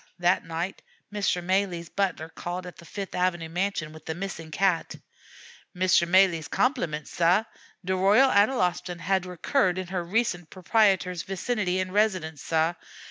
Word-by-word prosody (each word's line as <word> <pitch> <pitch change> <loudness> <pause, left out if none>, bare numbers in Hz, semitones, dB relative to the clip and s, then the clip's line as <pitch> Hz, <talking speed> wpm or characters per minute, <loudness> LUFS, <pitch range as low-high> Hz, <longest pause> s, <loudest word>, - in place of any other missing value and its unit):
That 175 +1 +2
night 165 +3 -4 0.3
Mr. 200 -4 0
Malee's 185 -2 0
butler 185 -5 -2
called 175 +2 -5
at 180 - -10
the 170 - -13
Fifth 195 +2 -6
Avenue 175 -2 0
mansion 175 -3 -2
with 155 0 -14
the 160 - -3
missing 175 -3 -6
cat. 180 +1 0 0.8
"Mr. 180 -1 +3
Malee's 175 -3 +4
compliments, 170 - -1
sah. 175 +5 +3 0.4
De 190 +1 0
Royal 210 +8 +5
Analostan 185 -5 +1
had 190 0 0
recurred 180 - +1
in 185 - -3
her 180 -2 -2
recent 175 -3 -1
proprietor's 190 -2 +2
vicinity 195 -1 -1
and 185 0 -3
residence, 185 -8 0
sah. 160 +1 +1
180 Hz, 145 wpm, -26 LUFS, 170-195 Hz, 0.8 s, Royal